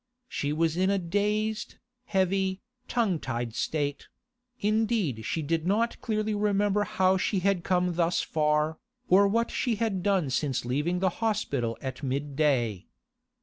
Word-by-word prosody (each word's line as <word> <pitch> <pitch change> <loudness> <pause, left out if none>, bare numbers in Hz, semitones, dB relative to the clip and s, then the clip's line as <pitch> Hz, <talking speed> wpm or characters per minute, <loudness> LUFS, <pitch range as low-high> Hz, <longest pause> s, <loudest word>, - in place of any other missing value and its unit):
She 145 - -2
was 160 +1 +1
in 190 +1 +2
a 200 - +2
dazed, 210 +4 -1 0.3
heavy, 190 0 +1 0.3
tongue 215 -9 +1
tied 120 -3 -3
state; 145 +2 -2 0.5
indeed 210 - 0
she 160 - -1
did 160 +2 -1
not 225 +4 +1
clearly 215 -1 -1
remember 205 0 +2
how 190 -3 +2
she 190 +1 0
had 195 -2 +1
come 180 -1 +1
thus 170 0 +1
far, 150 0 +1 0.3
or 200 +2 +6
what 230 +3 +1
she 240 -3 0
had 205 -3 -1
done 185 -7 +1
since 130 -2 -1
leaving 150 +9 0
the 190 - +3
hospital 140 - 0
at 130 0 -5
midday. 135 - 0
180 Hz, 145 wpm, -28 LUFS, 145-205 Hz, 0.5 s, or